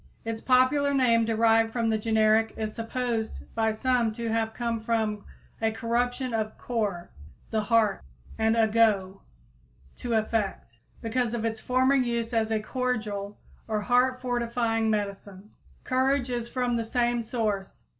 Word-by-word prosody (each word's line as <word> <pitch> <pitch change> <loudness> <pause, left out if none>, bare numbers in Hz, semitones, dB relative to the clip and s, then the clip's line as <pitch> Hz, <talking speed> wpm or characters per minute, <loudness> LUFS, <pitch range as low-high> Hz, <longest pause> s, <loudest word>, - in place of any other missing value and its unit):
Its 225 0 -4
popular 275 +3 +3
name, 230 -4 +3
derived 225 0 +3
from 230 -1 -1
the 220 - +2
generic, 220 0 +2
is 215 -1 -3
supposed 230 -1 -3
by 220 -1 +1
some 240 0 +1
to 230 +1 -4
have 225 0 0
come 235 0 -2
from 220 -2 -1 0.4
a 225 - +3
corruption 240 +3 -1
of 220 -1 -2
cor, 205 -8 -3 0.4
the 220 - +1
heart, 220 -1 +2 0.3
and 220 +1 +1
ago, 215 -4 +2 0.7
to 235 -2 -2
affect, 210 - -2 0.2
because 240 0 -1
of 230 -1 -2
its 225 -1 -2
former 255 +3 +2
use 240 -3 0
as 225 -1 +1
a 220 -1 +1
cordial 215 -4 -3 0.3
or 215 -2 -1
heart 250 +3 +2
fortifying 235 -2 0
medicine. 200 -1 -4 0.3
Courage 260 0 +1
is 240 -1 -3
from 245 -2 0
the 230 - -1
same 240 +1 0
source. 215 -4 -3
225 Hz, 145 wpm, -27 LUFS, 220-245 Hz, 0.7 s, popular